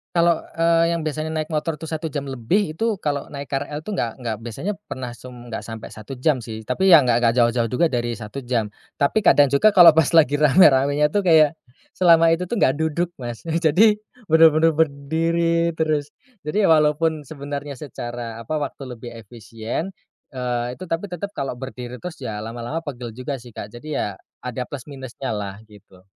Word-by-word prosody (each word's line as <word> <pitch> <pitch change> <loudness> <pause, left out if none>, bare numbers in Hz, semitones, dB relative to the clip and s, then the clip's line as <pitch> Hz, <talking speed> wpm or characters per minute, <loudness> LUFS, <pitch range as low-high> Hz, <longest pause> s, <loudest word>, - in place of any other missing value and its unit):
Kalau, 170 -1 +3
eee, 165 0 +2
yang 170 - -1
biasanya 155 0 -3
naik 155 -1 -2
motor 155 0 -2
tuh 160 - -7
1 160 -1 -4
jam 140 -2 -4
lebih, 155 - -1
itu 220 -1 -1
kalo 145 -1 -3
naik 140 0 -7
KRL 145 +2 -3
itu 215 - -8
nggak 115 - -1
nggak 115 -3 -3
biasanya 170 - -4
pernah 130 -1 -6
sem 125 +1 -11
nggak 120 -2 -8
sampai 115 -1 -8
1 110 +4 -10
jam 150 -1 +3
sih. 110 -1 -7
Tapi, 190 +9 +3
yang 145 -7 +7
nggak 115 - +4
nggak 115 -1 +2
jauh-jauh 120 0 +2
juga 170 +6 +3
dari 120 -3 -2
1 115 +4 -7
jam. 115 -4 -1 0.3
Tapi, 190 +9 +2
kadang 145 -5 +6
juga 140 +10 +4
kalo 170 -4 +8
pas 160 -1 +3
lagi 145 -3 +5
rame-ramenya 145 -1 +5
tuh 200 +4 -1
kayak, 160 -2 +5 0.4
selama 165 -2 +5
itu 165 +2 +2
tuh 235 +6 -4
nggak 130 - +4
duduk 160 +2 0
Mas, 120 -1 -6 0.2
jadi 180 +7 +4 0.3
bener-bener 160 0 +5
berdiri 165 +3 +1
terus. 155 -2 0 0.3
Jadi 190 +8 -1
walaupun 155 -1 +3
sebenarnya 145 0 -6
secara 120 -4 -7
apa 135 +7 -3
waktu 140 -2 -5
lebih 120 +1 -9
efisien, 115 - -6 0.4
eee, 125 -1 -2
itu 185 - -8
tapi 165 +3 -2
tetep 180 +3 -4
kalo 135 - -2
berdiri 125 -1 -7
terus 180 -2 -7
ya, 110 -5 -5
lama-lama 120 +7 -5
pegel 120 -5 -6
juga 130 +2 -4
sih 120 0 -13
Kak. 105 - -7
Jadi 150 +6 -8
ya, 100 -2 -2 0.3
ada 125 0 -4
plus-minusnyalah 120 -7 -6
gitu. 95 -3 -19
145 Hz, 180 wpm, -22 LUFS, 120-165 Hz, 0.4 s, kalo